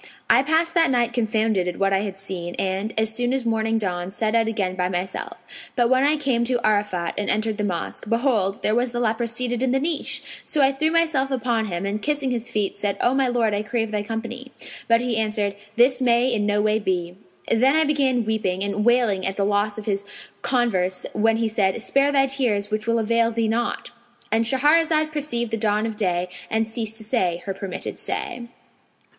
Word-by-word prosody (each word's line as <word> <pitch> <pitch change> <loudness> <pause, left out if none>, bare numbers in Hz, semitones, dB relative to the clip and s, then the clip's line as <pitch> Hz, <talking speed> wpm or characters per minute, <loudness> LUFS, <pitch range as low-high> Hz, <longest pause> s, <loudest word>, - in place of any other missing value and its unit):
I - - +6
passed 320 +4 +1
that 330 -2 +4
night 240 -2 +1
confounded 220 -5 +1
at 180 - -3
what 195 0 +1
I 195 - +3
had 195 -1 -4
seen; 185 -3 -5
and, 195 +3 -2
as 220 0 +1
soon 245 +2 0
as 265 -2 -1
morning 225 0 +1
dawned, 185 -2 -3
set 220 -1 0
out 225 -1 +3
again 200 -5 -1
by 180 -1 0
myself; 180 +1 -4 0.4
but 240 -1 +2
when 260 +1 +4
I 295 +2 +3
came 265 -5 +1
to 245 0 +1
Arafat[FN#504] 205 -5 0
and 205 - -1
entered 215 0 0
the - - 0
mosque, 185 +2 -4
behold, 230 -5 +1
there 215 - +2
was 240 +1 0
the 240 - -2
leper 230 0 0
seated 240 +1 -1
in 260 -1 +1
the 270 - +2
niche! 310 +1 -2 0.2
So 295 -3 +1
I 270 - +5
threw 310 +4 0
myself 320 -5 +2
upon 240 -4 0
him 180 -2 -3
and 205 +2 -2
kissing 290 -3 -1
his 240 -1 -3
feet 205 -2 -1
said, 200 -1 0
'O 245 - +2
my 270 -1 +2
lord, 235 -3 +1
I 205 - 0
crave 225 0 -2
thy 210 -1 -1
company.' 235 +4 -6 0.4
But 230 0 +4
he 245 -2 0
answered, 210 -2 0 0.2
'This 255 +3 +4
may 245 0 +3
in 210 -2 0
no 205 0 +1
way 215 0 +2
be.' 180 -4 -2 0.4
Then 260 +5 +4
I 315 - +5
began 270 -6 +1
weeping 200 -4 -1
and 200 +1 -1
wailing 235 -5 +2
at 195 - -3
the 200 - +1
loss 205 +1 0
of 215 - -7
his 200 -2 -1 0.4
converse, 190 -8 0
when 225 +1 +2
he 225 0 +1
said, 200 -3 0
'Spare 275 +1 +2
thy 270 -1 +4
tears 235 -7 -1
which 215 +1 -2
will 230 0 +2
avail 230 +1 +2
thee 230 -1 -1
naught!'" 235 +2 -2 0.4
And 225 +1 +2
Shahrazad 310 +5 +3
perceived 260 -7 -1
the 225 - 0
dawn 210 0 +1
of 225 -1 -3
day 180 -4 0 0.2
and 220 0 0
ceased 225 -1 -3
to 220 - -6
say 185 -7 -1
her 195 - -2
permitted 190 -1 -6
say. 355 -13 -4
225 Hz, 215 wpm, -23 LUFS, 205-250 Hz, 0.4 s, I